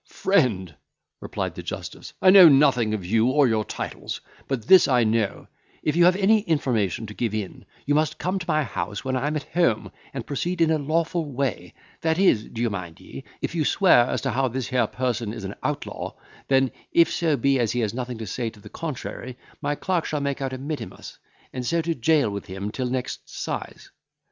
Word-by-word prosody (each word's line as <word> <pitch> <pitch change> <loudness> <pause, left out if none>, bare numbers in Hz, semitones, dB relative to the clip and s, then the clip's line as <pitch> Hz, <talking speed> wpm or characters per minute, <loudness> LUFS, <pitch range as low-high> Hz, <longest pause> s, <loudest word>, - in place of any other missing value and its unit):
"Friend," 115 - +1 0.5
replied - - -4
the - - -7
justice, - - -7
"I 185 - +8
know 185 -4 +10
nothing 125 -6 +4
of 95 -4 -6
you 110 +5 +2
or 140 +1 +4
your 110 -2 +1
titles; - - -5 0.3
but 125 -5 -3
this 185 +6 +7
I 125 -4 +3
know, 110 -2 0 0.4
if 150 - 0
you 175 0 +5
have 180 +1 +5
any 205 +3 +4
information 125 - 0
to 105 - -8
give 110 -1 -2
in, 105 -4 -5 0.2
you 145 - +1
must 155 -1 +1
come 185 +2 -1
to 175 - -6
my 155 -2 +2
house 110 -3 -4
when 130 0 -1
I 130 +3 0
am 155 - -1
at 150 - -2
home, 170 -11 +1 0.2
and 130 -4 -5
proceed 170 +5 -2
in 165 -1 +4
a 155 - +2
lawful 160 +1 -1
way, 120 -10 -3 0.3
that 160 0 +1
is, 180 - +3
d'ye 120 +1 -2
mind 90 -6 -5
me, 70 - -10 0.2
if - - -2
you 165 -2 0
swear 145 -7 +5
as - - -2
how 135 0 +1
this 130 0 -3
here 125 -2 +2
person 120 -4 -2
is - - -7
an 95 +1 -5
outlaw; 145 -1 -4 0.3
then 135 -2 +3 0.2
if 170 -1 +4
so 160 -4 +1
be 140 -1 +2
as 115 -3 +1
he 125 - 0
has 110 -2 -1
nothing 125 -1 -4
to 110 - -6
say 115 +4 -3
to 110 -1 -16
the - - -12
contrary, 130 -4 -6 0.2
my 145 0 -1
clerk 180 +1 -1
shall 150 - -2
make 140 -1 -2
out 135 -1 -2
a 130 - -4
mittimus, 145 +3 -7 0.3
and 125 - -4
so 170 +7 0
to 165 +1 0
jail 145 -3 +2
with 100 -1 -6
him 95 +2 -5
till 125 +1 -3
next 125 0 -4
'size." - - -6
130 Hz, 210 wpm, -24 LUFS, 115-155 Hz, 0.5 s, know